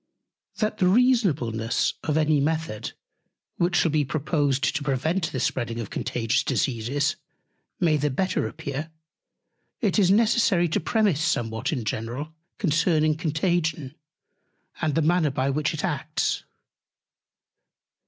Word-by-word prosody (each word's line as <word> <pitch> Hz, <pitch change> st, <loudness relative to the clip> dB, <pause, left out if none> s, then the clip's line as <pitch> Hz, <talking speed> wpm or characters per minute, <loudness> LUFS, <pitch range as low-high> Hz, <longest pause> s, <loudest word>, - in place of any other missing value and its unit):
That 215 Hz, 0 st, -2 dB
the 180 Hz, -, +4 dB
Reasonableness 180 Hz, -, +2 dB
of 155 Hz, -1 st, -1 dB
any 155 Hz, -1 st, +3 dB
Method, 155 Hz, -6 st, -2 dB, 0.6 s
which 175 Hz, +1 st, +1 dB
shall 165 Hz, -, +3 dB
be 150 Hz, -1 st, +2 dB
proposed 145 Hz, -1 st, 0 dB
to 150 Hz, -, -1 dB
prevent 155 Hz, +6 st, -1 dB
the 130 Hz, -, -3 dB
spreading 120 Hz, -1 st, -1 dB
of 115 Hz, -, -6 dB
Contagious 115 Hz, -1 st, 0 dB
Diseases, 135 Hz, +5 st, 0 dB, 0.6 s
may 165 Hz, -5 st, +3 dB
the 150 Hz, 0 st, 0 dB
better 185 Hz, +8 st, 0 dB
appear, 150 Hz, 0 st, -5 dB, 0.9 s
it 210 Hz, -2 st, +1 dB
is 190 Hz, -3 st, +4 dB
necessary 210 Hz, -4 st, +3 dB
to -, -, +1 dB
premise 205 Hz, -9 st, +1 dB
somewhat 115 Hz, -5 st, -1 dB
in 125 Hz, -8 st, -3 dB
general 120 Hz, +9 st, -4 dB, 0.2 s
concerning 155 Hz, -3 st, +2 dB
Contagion, 160 Hz, -3 st, -1 dB, 0.9 s
and 155 Hz, -2 st, 0 dB
the 165 Hz, -, +2 dB
Manner, 165 Hz, -1 st, +3 dB
by 135 Hz, 0 st, 0 dB
which 150 Hz, +2 st, 0 dB
it 155 Hz, -2 st, -4 dB
acts. -, -, -2 dB
155 Hz, 125 wpm, -25 LUFS, 135-175 Hz, 0.9 s, the